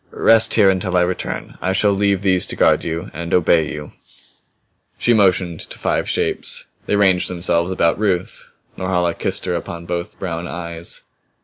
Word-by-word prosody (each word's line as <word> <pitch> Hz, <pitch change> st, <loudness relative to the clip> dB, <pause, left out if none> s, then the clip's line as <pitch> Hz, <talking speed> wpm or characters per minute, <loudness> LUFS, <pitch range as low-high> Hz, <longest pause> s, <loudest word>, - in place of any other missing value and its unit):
"Rest 115 Hz, 0 st, +4 dB
here 100 Hz, -3 st, +5 dB
until 90 Hz, -1 st, -1 dB
I 90 Hz, -, +4 dB
return. 90 Hz, 0 st, -4 dB
I 95 Hz, -, 0 dB
shall 100 Hz, +2 st, +2 dB
leave 100 Hz, 0 st, +1 dB
these 95 Hz, -2 st, +3 dB
to -, -, -4 dB
guard -, -, +3 dB
you 85 Hz, +4 st, -4 dB
and 85 Hz, +1 st, -6 dB
obey 80 Hz, -3 st, +3 dB
you." 75 Hz, -1 st, -7 dB, 1.1 s
She 120 Hz, -, +2 dB
motioned 95 Hz, -5 st, +2 dB
to -, -, -6 dB
the -, -, -9 dB
five -, -, -1 dB
shapes. -, -, -1 dB, 0.2 s
They -, -, +1 dB
ranged 95 Hz, -3 st, +3 dB
themselves 85 Hz, -1 st, 0 dB
about 85 Hz, -1 st, +1 dB
Ruth. 95 Hz, -4 st, -2 dB, 0.3 s
Norhala 90 Hz, -2 st, 0 dB
kissed -, -, -2 dB
her 90 Hz, -, -1 dB
upon 85 Hz, 0 st, -5 dB
both 85 Hz, 0 st, -4 dB
brown 85 Hz, -2 st, -4 dB
eyes. 85 Hz, -1 st, -4 dB
90 Hz, 175 wpm, -19 LUFS, 85-95 Hz, 1.1 s, here